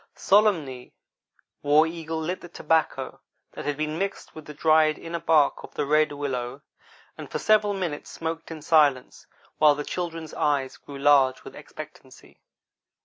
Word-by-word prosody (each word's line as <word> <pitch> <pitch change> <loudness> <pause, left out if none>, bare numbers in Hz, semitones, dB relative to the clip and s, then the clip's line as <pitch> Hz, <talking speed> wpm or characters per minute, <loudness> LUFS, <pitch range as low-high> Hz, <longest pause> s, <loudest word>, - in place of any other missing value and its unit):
Solemnly 165 -12 +1 0.7
War 150 +2 +4
Eagle 160 -1 -5
lit 175 +4 -3
the 175 - -11
tobacco 160 -1 -1 0.3
that - - -8
had 145 -1 -2
been 155 +1 -3
mixed 195 0 -4
with 155 - -11
the 150 - -9
dried 155 0 +3
inner 170 0 -5
bark 155 -3 +2
of - - -13
the - - -1
red 155 +1 +3
willow, 135 -2 -4 0.6
and - - -8
for - - -3
several 210 -1 +2
minutes 175 -6 -4
smoked 165 0 -5
in 160 -2 -8
silence, 145 -5 +2 0.3
while 150 -1 +6
the 150 - -4
children's 165 -3 -5
eyes 140 -3 -1
grew 140 - -11
large 135 -2 +3
with - - -11
expectancy. - - -13
155 Hz, 155 wpm, -25 LUFS, 145-165 Hz, 0.7 s, while